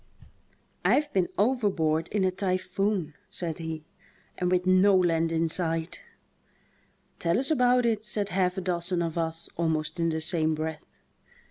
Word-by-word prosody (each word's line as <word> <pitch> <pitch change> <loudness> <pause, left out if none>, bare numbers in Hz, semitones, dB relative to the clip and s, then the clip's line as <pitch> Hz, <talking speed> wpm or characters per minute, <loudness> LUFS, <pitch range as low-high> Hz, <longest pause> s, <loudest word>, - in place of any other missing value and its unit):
"I've 295 0 +2
been 185 -2 +2
overboard 190 -9 +1
in 205 -1 -1
a 185 - +2
typhoon," 185 -2 -1 0.2
said 165 -3 -3
he, 160 -1 -5 0.5
"and 180 - -1
with 180 0 +1
no 185 +2 +5
land 165 -3 +2
in 165 0 +1
sight." 165 - -1 1.2
"Tell 170 0 +1
us 270 +5 +2
about 250 -3 +3
it," 220 -2 0
said 210 -2 -1
half 185 -1 0
a - - -1
dozen 175 -1 0
of 165 -1 -3
us 165 0 -1
almost 160 0 -1
in 165 0 +2
the 160 0 -1
same 160 -1 +1
breath. 155 0 -7
175 Hz, 150 wpm, -27 LUFS, 165-195 Hz, 1.2 s, no